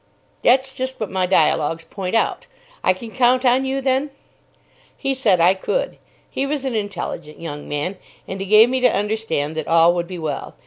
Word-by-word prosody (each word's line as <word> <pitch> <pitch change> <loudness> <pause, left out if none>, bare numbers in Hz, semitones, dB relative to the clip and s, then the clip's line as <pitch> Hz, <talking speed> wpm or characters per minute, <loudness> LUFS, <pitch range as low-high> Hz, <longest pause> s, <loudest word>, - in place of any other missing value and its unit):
"That's 265 +1 +3
just 260 0 -4
what 215 - -4
my 185 -1 0
dialogues 165 -2 +2
point 185 +4 -4
out. 485 - 0 0.4
I - - +4
can 220 +5 -6
count 255 +1 +3
on 255 +2 +3
you, 270 +1 -1
then?" 265 +2 0 0.9
He 270 -1 -1
said 220 -9 +2
I 175 +3 +5
could. - - -3 0.3
He 275 - -3
was 280 -1 -3
an 260 - -2
intelligent 200 -7 -5
young 150 -3 -7
man, 150 +7 -3 0.3
and 190 - -5
he 195 - -4
gave 215 +3 +7
me 260 +1 0
to 250 -2 +4
understand 205 -8 -2
that 155 - -3
all 165 +1 +5
would 175 -1 -2
be 185 0 -7
well. 155 -4 -5
210 Hz, 190 wpm, -21 LUFS, 170-260 Hz, 0.9 s, gave